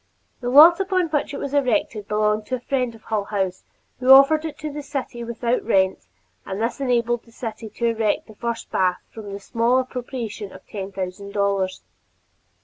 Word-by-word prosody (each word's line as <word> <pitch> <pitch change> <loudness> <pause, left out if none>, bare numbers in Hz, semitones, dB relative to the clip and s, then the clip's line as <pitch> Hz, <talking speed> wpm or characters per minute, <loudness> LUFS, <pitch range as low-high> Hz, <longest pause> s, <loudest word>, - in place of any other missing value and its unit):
The 245 - -3
lot 315 +7 +8
upon 375 -3 +1
which 295 -2 -1
it 285 - -5
was 280 - -4
erected 255 -6 0
belonged 210 0 +1
to 255 - -1
a - - -6
friend 250 -2 -1
of 220 - -17
Hull 215 -3 -2
House 190 -3 -2 0.4
who 255 0 -1
offered 275 +4 +7
it 305 -2 -5
to 305 -1 -5
the 295 - -5
city 275 -4 -5
without 235 +1 -1
rent, 190 - +1 0.4
and 190 - -5
this 230 +4 -2
enabled 240 -2 +1
the 230 - -21
city 225 -2 -6
to 235 - -3
erect 225 -2 +1
the 220 - -14
first 235 +2 -4
public 185 -1 +2
bath - - -22
from 210 -3 -9
the 200 - -6
small 230 +4 +1
appropriation 245 -5 -4
of - - -13
ten 195 -2 -6
thousand 195 +1 -6
dollars. 200 -2 0
235 Hz, 195 wpm, -23 LUFS, 205-265 Hz, 0.4 s, lot